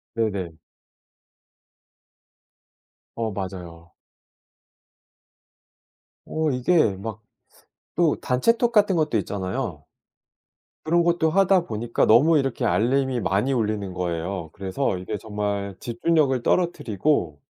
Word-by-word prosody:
네네. 100 -7 -2 2.6
어. 115 -2 -2
맞아요. 90 -4 -7 2.3
어 155 -1 -1
이게 125 - +2
막 110 +2 -7 0.8
또 165 -3 +4
단체 130 - +2
톡 240 -1 +1
같은 205 -4 +3
것도 155 -8 +1
있잖아요. 95 - -4 1.0
그런 170 +2 +3
것도 170 -2 +2
하다 190 0 +3
보니까 115 +1 -1
너무 150 +9 +5
이렇게 135 -3 -1
알림이 130 +1 +1
많이 100 +9 0
울리는 105 -5 -1
거예요. 85 -1 -3
그래서 95 +2 -2
이게 105 +4 -5
정말 100 -1 -3
집중력을 135 +1 +1
떨어뜨리고. 110 - 0
115 Hz, 215 characters per minute, -24 LUFS, 95-150 Hz, 2.6 s, 너무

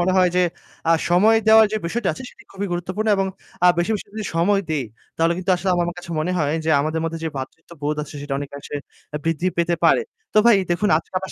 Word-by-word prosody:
মনে 185 +2 +2
হয় 180 -1 +4
যে, 180 - +4 0.5
আ - - +7 0.2
সময় 210 +6 +5
দেওয়ার 220 0 +8
যে 215 - +1
বিষয়টা 220 +4 -1
আছে - - -9
সেটি - - -18
খুবই 200 +1 -3
গুরুত্বপূর্ণ 185 +5 -2
এবং 195 0 +1 0.4
আ - - +8
বেশি, 175 +6 +1
বেশি, 210 - -4
করে 200 - -26
যদি 215 - -3
সময় 195 +4 +3
দেই, 145 -5 0 0.3
তাহলে 165 +1 +2
কিন্তু 185 +1 -2
আসলে 185 +1 -1
আমার 175 -1 +1
আমার 175 +1 -5
কাছে 175 - -10
মনে 180 +4 -1
হয় 150 -1 +1
যে, 160 - +1
আমাদের 155 +2 -1
মধ্যে 165 0 -3
যে 160 - 0
ভ্রাতৃত্ববোধ 150 +2 -5
আছে 150 - -10
সেটা 145 -1 -3
অনেকাংশে 140 +1 -6 0.4
আ - - 0
বৃদ্ধি 165 +2 0
পেতে 170 0 +2
পারে। - - +4 0.3
তো - - +6
ভাই 235 -4 +7
দেখুন 205 +4 +1
আজকে 165 - -13
আপনার 190 -1 -7
175 Hz, 240 wpm, -22 LUFS, 160-195 Hz, 0.5 s, দেওয়ার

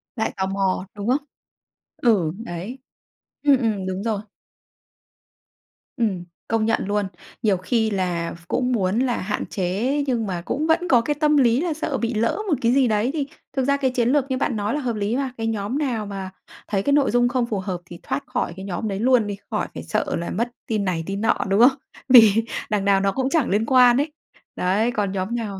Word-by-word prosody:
Lại 220 - -1
tò 190 - 0
mò, 195 -1 -1
đúng 205 +1 -5
không? 280 +3 +1 0.7
Ừ, 200 -10 +2
đấy. 190 +8 -6 0.6
Ừm, 285 -2 +5
ừm, 220 -6 -1
đúng 190 +2 -3
rồi. 220 -3 -1 1.8
Ừm, 205 -7 0 0.2
công 225 -1 +1
nhận 225 -2 +1
luôn. 205 0 0 0.4
Nhiều 205 -4 +3
khi 220 +4 0
là 180 -4 -1
v 170 - -13
cũng 250 +5 0
muốn 205 -2 +1
là 250 -2 +1
hạn 205 +2 -3
chế, 215 +10 -1
nhưng 235 -4 0
mà 180 -3 -3
cũng 305 +3 -1
vẫn 340 +2 +2
có 250 -8 +5
cái 295 +6 -1
tâm 300 0 +2
lý 245 -1 +4
là 340 -2 -1
sợ 300 -2 -2
bị 235 0 -1
lỡ 230 +1 +1
một - - +3
cái 235 - +3
gì 265 -1 +4
đấy, 215 +2 +1
thì 290 -3 -2 0.3
thực 265 - +2
ra 280 +1 +2
cái 265 -2 0
chiến 245 -1 +1
lược 280 -1 +3
như 260 - +1
bạn 255 - 0
nói 210 +2 -1
là 295 - 0
hợp 245 -5 -2
lý 210 +2 -1
mà. 270 -1 -1
Cái 225 0 -2
nhóm 220 +3 -2
nào 250 -8 -1
mà 195 -2 -5 0.4
thấy 195 -2 -1
cái 285 - +2
nội 285 -1 +3
dung 245 +1 +3
không 245 -1 0
phù 210 -4 -2
hợp 185 -1 -3
thì 175 -1 -11
thoát 135 +1 -3
khỏi - - -2
cái 190 +1 -8
nhóm 200 +3 -3
đấy 195 -2 -3
luôn 240 -2 +3
đi, 200 -1 -4
khỏi - - -1
phải - - -7
sợ - - -1
là 170 - -4
mất 235 +5 -1 0.2
tin 215 -3 -1
này 175 -3 -1
tin 195 +2 -4
nọ, 225 - +2
đúng 195 +2 +2
không? 260 +3 +6 0.3
Vì 225 -3 +7 0.2
đằng 205 -2 0
nào 200 -1 +4
nó 195 0 +1
cũng 265 +4 -1
chẳng 315 -3 +1
liên 210 +3 +1
quan 250 -1 +6
ấy. 290 +3 0 0.4
Đấy, 205 +6 +1
còn 205 -4 -1
nhóm 195 +4 -2
nào 210 -5 -4
225 Hz, 225 wpm, -23 LUFS, 195-255 Hz, 1.8 s, Vì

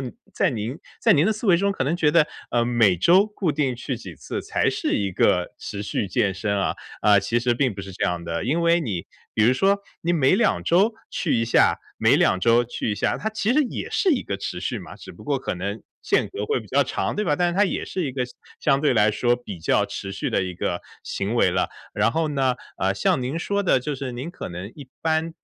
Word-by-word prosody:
你 130 - -4 0.2
在 - - +2
您 115 +2 -4 0.2
在 - - +5
您 150 - +4
的 220 - +3
思 220 +2 -6
维 180 -4 +6
中 200 +3 +1
可 195 -9 -1
能 155 +6 0
觉 155 -4 +3
得， 160 -1 +4 0.2
呃， 120 -1 +2
每 115 -6 +3
周 175 - +5
固 200 -6 -2
定 140 -4 0
去 125 +1 -4
几 90 -8 -10
次， - - -5
才 - - 0
是 - - -1
一 100 -2 -1
个 90 0 +2
持 100 0 -6
续 100 - -2
健 95 +1 +1
身 100 +1 -1
啊。 95 - 0 0.3
啊， 100 -1 +5
其 110 +4 0
实 120 0 +1
并 130 0 +1
不 100 - -7
是 95 0 -8
这 - - -6
样 90 -1 -1
的， 85 0 -3
因 150 +8 +1
为 170 +1 +4
你 100 - -3 0.3
比 110 - +2
如 120 - +5
说 195 +10 +2 0.2
你 170 - 0
每 150 -2 +4
2 200 -1 +1
周 195 +7 +3 0.2
去 165 - 0
一 - - +1
下， 115 - +3 0.2
每 - - +4
2 95 - +3
周 120 +3 +4
去 115 -1 -3
一 - - 0
下， - - 0
它 220 - -2
其 220 +1 0
实 300 +4 +4
也 255 - -4
是 385 - +2
一 275 -6 +2
个 - - -3
持 - - -5
续 - - -3
嘛， - - -11
只 - - -11
不 - - -14
过 - - 0
可 - - -3
能 - - -4 0.2
间 - - +1
隔 400 - -3
会 440 - +1
比 - - -13
较 - - +3
长， - - -2
对 210 - 0
吧？ 150 - +2
但 175 +2 +2
是 - - -4
它 205 - +5
也 - - -2
是 185 - -3
一 130 - -4
个 125 -1 -1
相 125 - -13 0.3
相 140 -2 +3
对 145 -3 +2
来 105 -1 +4
说， 120 +3 +1
比 115 -7 -8
较 80 - +2
持 95 - -6
续 - - -3
的 - - +1
一 90 -1 -4
个 85 0 -2 0.2
行 100 +4 -3
为 115 - +3
了。 90 +1 0 0.2
然 - - +2
后 160 0 0
呢， 135 -3 +1 0.2
呃， 95 +1 +1
像 100 - +1
您 130 +6 -2
说 200 +3 -1
的， 175 - +3
就 150 +3 -3
是 135 -1 -5
您 130 +7 -5
可 - - -7
能 90 +2 -6
一 140 -4 -11
般 160 0 0
130 Hz, 275 characters per minute, -23 LUFS, 105-170 Hz, 0.3 s, 维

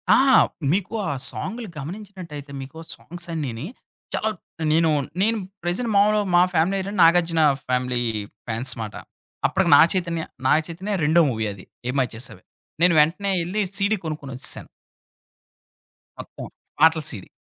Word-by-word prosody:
ఆ! - - +5 0.5
మీకు 190 +4 -1 0.2
ఆ - - 0 0.2
సాంగులు 225 +2 -5
గమనించినట్టయితే 170 -3 -8
మీకు 135 +4 -10 0.2
సాంగ్సన్నీని, 160 -8 -5 0.5
చాల - - 0 0.4
నేను 165 +1 +4 0.3
నేను 225 +3 +2 0.3
ప్రెజెంట్ 185 +7 -1
మామూలుగా 210 0 +4
మా 175 - +7
ఫ్యామిలీ 170 +4 +2
ఏంటంటే, 200 +2 -5
'నాగార్జున' 165 -1 +5 0.2
ఫ్యామిలీ 125 -1 0 0.5
ఫాన్స్ 120 +3 -1
మాట. 105 -2 -6 0.5
అప్పటికి - - +1
'నాగ - - +8
చైతన్య-' 170 -3 -2 0.2
'నాగ 150 - +5
చైతన్య' 190 +4 -3
రెండో 160 +3 +5
మూవీ 110 -2 -2
అది 95 -2 -13 0.2
ఏం 125 - -2
మాయ 130 -3 +1
చేసావే. 115 +4 -6 0.4
నేను 180 -1 +6
వెంటనే 185 +6 +1
ఎళ్లి, 190 +5 -1 0.2
సీడీ 200 +2 +2
కొనుక్కొనొచ్చేసా. 140 -4 -2 1.6
మొత్తం. - - -8 0.3
పాటల 160 +1 +5
సీడీ. 100 -5 -7
165 Hz, 130 wpm, -23 LUFS, 140-195 Hz, 1.6 s, నాగ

